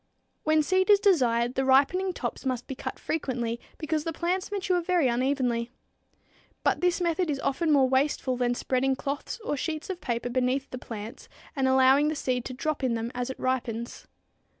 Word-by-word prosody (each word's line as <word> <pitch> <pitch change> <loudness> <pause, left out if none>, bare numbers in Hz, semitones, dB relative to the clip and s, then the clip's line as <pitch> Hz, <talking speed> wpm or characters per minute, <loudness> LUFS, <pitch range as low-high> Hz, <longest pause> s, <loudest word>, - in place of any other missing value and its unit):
When 310 0 +4
seed 375 +5 +1
is 410 -1 +7
desired, 250 - +3
the 265 - 0
ripening 285 +9 +3
tops - - -5
must 255 -2 -2
be - - -5
cut 260 - -6
frequently, 240 -6 -2 0.2
because 310 -1 -1
the 330 - -2
plants 360 +4 -2
mature 380 -3 0
very 345 -4 +2
unevenly. 245 -1 0 0.9
But - - +1
this 360 0 +2
method 345 0 0
is 280 -2 -1
often 310 +4 0
more 275 -3 +5
wasteful 265 0 +1
than 245 -1 0
spreading 265 +2 0
cloths 280 - -4
or - - 0
sheets 310 +5 -3
of 360 - -7
paper 240 0 -2
beneath 255 +2 0
the 255 - -5
plants 225 -1 -8 0.3
and 270 -2 +1
allowing 265 +2 +5
the 310 - 0
seed 250 -4 -1
to 255 - -5
drop 300 +1 -2
in 245 -3 +1
them 230 +1 -3
as 245 +1 -3
it 265 - -6
ripens. 240 -3 -3
270 Hz, 185 wpm, -27 LUFS, 250-320 Hz, 0.9 s, is